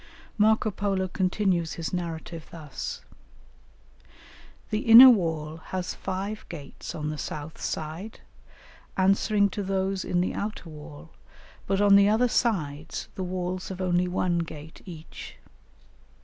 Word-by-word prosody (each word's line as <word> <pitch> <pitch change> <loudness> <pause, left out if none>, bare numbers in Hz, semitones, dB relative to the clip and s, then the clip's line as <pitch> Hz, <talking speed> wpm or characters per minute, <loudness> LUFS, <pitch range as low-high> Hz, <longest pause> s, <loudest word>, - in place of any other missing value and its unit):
] - - -23
Marco 215 0 +3
Polo 195 -1 -1
continues 185 -2 0
his 165 +1 -5
narrative 165 -2 -5
thus: 155 -4 -7 1.7
"The 215 - +1
inner 240 +3 +10
wall 160 -7 -1
has 185 -1 -3
five 195 +3 -4
gates 145 -6 -8
on 150 -1 -3
the 155 - -6
south 150 +1 -6
side, 165 +8 -5 0.8
answering 200 +2 +3
to 205 - -3
those 195 0 -1
in 175 - 0
the 180 - 0
outer 205 -5 -5
wall, 150 +1 -11 0.6
but 195 0 +1
on 200 -1 +6
the 200 0 +6
other 225 +4 +3
sides 160 - -1
the 190 - -4
walls 180 0 -3
have 190 -1 -6
only 180 -1 +1
one 180 -1 0
gate 160 -1 -7
each. 165 -3 -10
185 Hz, 135 wpm, -27 LUFS, 160-200 Hz, 1.7 s, inner